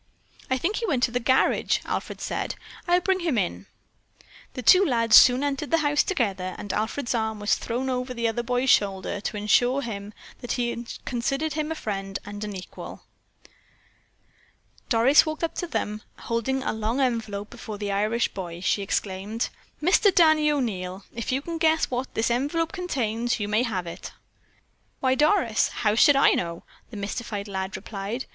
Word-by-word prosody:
"I 260 Hz, -, +2 dB
think 360 Hz, +10 st, -1 dB
he 460 Hz, -, -2 dB
went 265 Hz, -8 st, 0 dB
to 250 Hz, -, +3 dB
the 245 Hz, -, 0 dB
garage," 260 Hz, +2 st, +2 dB
Alfred -, -, -4 dB
said. -, -, -3 dB, 0.3 s
"I'll 355 Hz, +1 st, +4 dB
bring 380 Hz, +1 st, +1 dB
him 330 Hz, -8 st, 0 dB
in." 90 Hz, -, -2 dB, 0.9 s
The 255 Hz, -, -5 dB
two 370 Hz, -, +7 dB
lads 230 Hz, -, +3 dB
soon 250 Hz, +2 st, +8 dB
entered 285 Hz, 0 st, -2 dB
the 330 Hz, -, +3 dB
house 290 Hz, 0 st, +3 dB
together 195 Hz, -, -1 dB
and 205 Hz, -, -5 dB
Alfred's 230 Hz, +5 st, -1 dB
arm 220 Hz, -2 st, -1 dB
was 205 Hz, 0 st, +1 dB
thrown 245 Hz, +3 st, -2 dB
over 255 Hz, 0 st, -2 dB
the 235 Hz, -2 st, -1 dB
other 225 Hz, +1 st, -1 dB
boy's 250 Hz, +2 st, +1 dB
shoulder 195 Hz, 0 st, +1 dB
to 210 Hz, -, -4 dB
assure 245 Hz, +6 st, +2 dB
him 205 Hz, -3 st, -6 dB, 0.3 s
that 245 Hz, -, -3 dB
he 240 Hz, -1 st, -2 dB, 0.2 s
considered 275 Hz, +5 st, -1 dB
him 310 Hz, 0 st, -2 dB
a -, -, -2 dB
friend 195 Hz, -6 st, -4 dB
and 205 Hz, +1 st, -7 dB
an 210 Hz, -1 st, -5 dB
equal. 185 Hz, -1 st, -9 dB, 1.9 s
Doris 245 Hz, +5 st, +6 dB
walked 310 Hz, +1 st, -4 dB
up 330 Hz, -, 0 dB
to 350 Hz, -, -4 dB
them 210 Hz, -9 st, -3 dB, 0.2 s
and, -, -, -16 dB
holding 260 Hz, +3 st, -1 dB
a -, -, -1 dB
long 220 Hz, +4 st, -2 dB
envelope 220 Hz, -6 st, -1 dB
before 225 Hz, -4 st, -7 dB
the 205 Hz, -1 st, -3 dB
Irish 215 Hz, +4 st, +1 dB
boy, 175 Hz, -3 st, -7 dB
she 195 Hz, +2 st, 0 dB
exclaimed: 200 Hz, +3 st, -2 dB, 0.3 s
"Mister 370 Hz, +6 st, +5 dB
Danny 315 Hz, -4 st, +5 dB
O'Neil, 195 Hz, -9 st, -3 dB
if 230 Hz, +1 st, -3 dB
you 265 Hz, +2 st, -1 dB
can 335 Hz, 0 st, -5 dB
guess 320 Hz, -2 st, +2 dB
what 250 Hz, +1 st, -2 dB
this 225 Hz, +1 st, +1 dB
envelope 295 Hz, +7 st, 0 dB
contains, 240 Hz, -, -1 dB
you 205 Hz, -, -2 dB
may 215 Hz, +2 st, +2 dB
have 200 Hz, -8 st, -2 dB
it." 170 Hz, +2 st, -8 dB, 0.9 s
"Why, 260 Hz, -1 st, +2 dB
Doris, 295 Hz, -, +3 dB
how 210 Hz, -2 st, 0 dB
should 280 Hz, +6 st, +6 dB
I 275 Hz, -, +6 dB
know?" 170 Hz, -1 st, -2 dB, 0.3 s
the 220 Hz, -, -9 dB
mystified 205 Hz, 0 st, -4 dB
lad 190 Hz, -1 st, -4 dB
replied. 205 Hz, +5 st, -5 dB
235 Hz, 180 wpm, -25 LUFS, 205-275 Hz, 1.9 s, soon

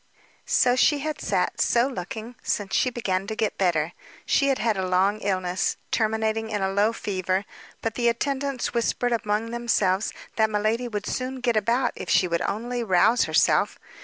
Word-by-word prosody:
So 245 Hz, -, +4 dB
had 250 Hz, -, +1 dB
she 295 Hz, +1 st, +3 dB
sat, -, -, -1 dB
so 235 Hz, +1 st, +3 dB
looking, 225 Hz, -1 st, -6 dB
since 200 Hz, -2 st, -2 dB
she 255 Hz, -, +3 dB
began 195 Hz, -6 st, -2 dB
to 220 Hz, -, -3 dB
get 215 Hz, -2 st, -1 dB
better. 170 Hz, -3 st, +1 dB, 0.3 s
She 275 Hz, -, +2 dB
had 270 Hz, -1 st, +2 dB
had 225 Hz, -1 st, +1 dB
a 190 Hz, -1 st, -2 dB
long 190 Hz, +3 st, +2 dB
illness, 185 Hz, -3 st, -1 dB
terminating 220 Hz, 0 st, 0 dB
in 205 Hz, -2 st, -2 dB
a 190 Hz, -, 0 dB
low 205 Hz, +3 st, +2 dB
fever; 190 Hz, -3 st, -2 dB, 0.4 s
but 225 Hz, -, -1 dB
the 235 Hz, 0 st, 0 dB
attendants 275 Hz, +2 st, -2 dB
whispered 245 Hz, +1 st, 0 dB
among 220 Hz, 0 st, -1 dB
themselves 220 Hz, -5 st, +1 dB, 0.3 s
that 220 Hz, -1 st, +3 dB
miladi 215 Hz, +3 st, 0 dB
would 210 Hz, -3 st, -4 dB
soon 255 Hz, 0 st, -3 dB
get 245 Hz, -2 st, 0 dB
about 230 Hz, +5 st, +1 dB
if -, -, -7 dB
she 185 Hz, -, +4 dB
would 170 Hz, -1 st, -1 dB
only 240 Hz, +4 st, -2 dB
rouse 200 Hz, +4 st, +4 dB
herself. -, -, +2 dB
220 Hz, 175 wpm, -25 LUFS, 195-240 Hz, 0.4 s, So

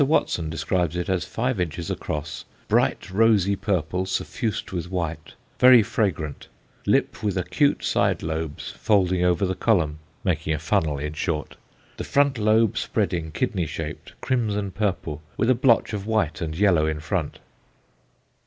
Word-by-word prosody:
Watson 90 Hz, -, +1 dB
describes 80 Hz, +2 st, -1 dB
it 90 Hz, +1 st, -2 dB
as 95 Hz, -2 st, 0 dB
five 125 Hz, -1 st, -2 dB
inches 85 Hz, -1 st, -3 dB
across, 75 Hz, 0 st, -4 dB, 0.2 s
"bright -, -, +1 dB
rosy 100 Hz, -1 st, +3 dB
purple 95 Hz, -1 st, -1 dB
suffused 110 Hz, +3 st, -3 dB
with 90 Hz, -2 st, -4 dB
white, 80 Hz, -4 st, -4 dB, 0.2 s
very 125 Hz, -3 st, +8 dB
fragrant, 85 Hz, -9 st, -2 dB, 0.4 s
lip -, -, +1 dB
with 100 Hz, -3 st, -1 dB
acute 140 Hz, -, +1 dB
side -, -, +1 dB
lobes 80 Hz, -2 st, -4 dB
folding 95 Hz, -4 st, +2 dB
over 90 Hz, +2 st, +2 dB
the 95 Hz, -, -1 dB
column," 85 Hz, -8 st, +1 dB, 0.2 s
making 80 Hz, -4 st, 0 dB
a -, -, -3 dB
funnel, 80 Hz, -1 st, 0 dB
in 75 Hz, +2 st, -4 dB
short 75 Hz, -1 st, -3 dB, 0.4 s
"the -, -, -4 dB
front 140 Hz, -3 st, +2 dB
lobe 110 Hz, 0 st, +3 dB
spreading, 85 Hz, -2 st, -1 dB
kidney 95 Hz, -, -1 dB
shaped, 80 Hz, 0 st, -6 dB
crimson 105 Hz, -6 st, -1 dB
purple, 90 Hz, -7 st, -2 dB, 0.2 s
with 120 Hz, -, +3 dB
a -, -, +6 dB
blotch 120 Hz, -2 st, +3 dB
of 100 Hz, 0 st, -4 dB
white 110 Hz, -9 st, 0 dB
and 80 Hz, -1 st, -3 dB
yellow 90 Hz, -6 st, +3 dB
in 80 Hz, -1 st, -2 dB
front." 80 Hz, +1 st, -2 dB
90 Hz, 150 wpm, -24 LUFS, 80-105 Hz, 0.4 s, very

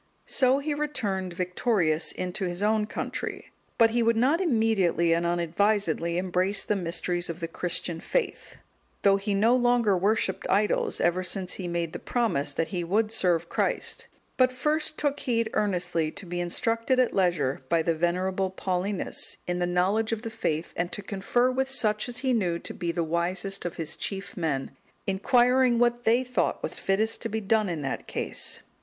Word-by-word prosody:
So 260 Hz, 0 st, +3 dB
he 295 Hz, +2 st, -2 dB
returned 215 Hz, -12 st, -2 dB
victorious 180 Hz, -3 st, +1 dB
into 185 Hz, +2 st, -3 dB
his 175 Hz, +2 st, -3 dB
own 215 Hz, 0 st, +2 dB
country, -, -, -5 dB, 0.3 s
but 225 Hz, -1 st, +5 dB
he 240 Hz, +1 st, +1 dB
would 230 Hz, 0 st, +3 dB
not 280 Hz, +9 st, +3 dB
immediately 220 Hz, -, +2 dB
and 170 Hz, +1 st, +1 dB
unadvisedly 170 Hz, 0 st, +1 dB
embrace 185 Hz, +2 st, +1 dB
the 210 Hz, -, 0 dB
mysteries 175 Hz, -1 st, -1 dB
of 170 Hz, 0 st, -5 dB
the 165 Hz, -, -3 dB
Christian 170 Hz, 0 st, -2 dB
faith, -, -, -2 dB, 0.5 s
though 195 Hz, -1 st, +5 dB
he 200 Hz, 0 st, -1 dB
no 225 Hz, +5 st, +4 dB
longer 240 Hz, -4 st, +3 dB
worshipped 195 Hz, +1 st, 0 dB
idols, 205 Hz, +2 st, +1 dB
ever 175 Hz, +2 st, +2 dB
since 180 Hz, 0 st, -3 dB
he 185 Hz, -, -4 dB
made 170 Hz, -1 st, -2 dB
the -, -, -5 dB
promise 220 Hz, -, 0 dB
that 160 Hz, +3 st, -2 dB
he 175 Hz, -1 st, -2 dB
would 210 Hz, +5 st, +1 dB
serve 175 Hz, -6 st, +1 dB
Christ; -, -, -1 dB, 0.3 s
but 255 Hz, -1 st, +4 dB
first 305 Hz, +4 st, -1 dB
took 290 Hz, -1 st, 0 dB
heed 230 Hz, -4 st, 0 dB
earnestly 175 Hz, -5 st, 0 dB
to 200 Hz, -, -6 dB
be 175 Hz, 0 st, -4 dB
instructed 230 Hz, +8 st, 0 dB
at 255 Hz, -, +3 dB
leisure 170 Hz, -8 st, +1 dB
by 165 Hz, -1 st, +3 dB
the 165 Hz, -, +2 dB
venerable 185 Hz, +3 st, 0 dB
Paulinus, 185 Hz, +1 st, -2 dB
in 175 Hz, 0 st, -2 dB
the 175 Hz, -, +1 dB
knowledge 195 Hz, +6 st, +1 dB
of 225 Hz, 0 st, -2 dB
faith, 160 Hz, +1 st, -2 dB
and 175 Hz, 0 st, -2 dB
to 205 Hz, -, -4 dB
confer 215 Hz, +6 st, +1 dB
with 265 Hz, +1 st, -1 dB
such 215 Hz, -4 st, +1 dB
as 245 Hz, -, -6 dB
he 260 Hz, -, +3 dB
knew 180 Hz, -7 st, +1 dB
to -, -, -7 dB
be 170 Hz, -1 st, -2 dB
the 170 Hz, 0 st, -1 dB
wisest 175 Hz, +4 st, -1 dB
of 175 Hz, -, -3 dB
his 160 Hz, -1 st, -5 dB
chief 195 Hz, 0 st, -5 dB
men, 150 Hz, -7 st, -2 dB, 0.3 s
inquiring 245 Hz, +5 st, +3 dB
what 240 Hz, 0 st, +2 dB
they 235 Hz, +3 st, +4 dB
thought 250 Hz, 0 st, -1 dB
was -, -, -3 dB
fittest 215 Hz, +4 st, 0 dB
to -, -, -2 dB
be 220 Hz, -, -1 dB
done 215 Hz, 0 st, +1 dB
in 160 Hz, -4 st, -3 dB
that 135 Hz, -, -4 dB
case. -, -, -3 dB
195 Hz, 180 wpm, -27 LUFS, 175-230 Hz, 0.5 s, but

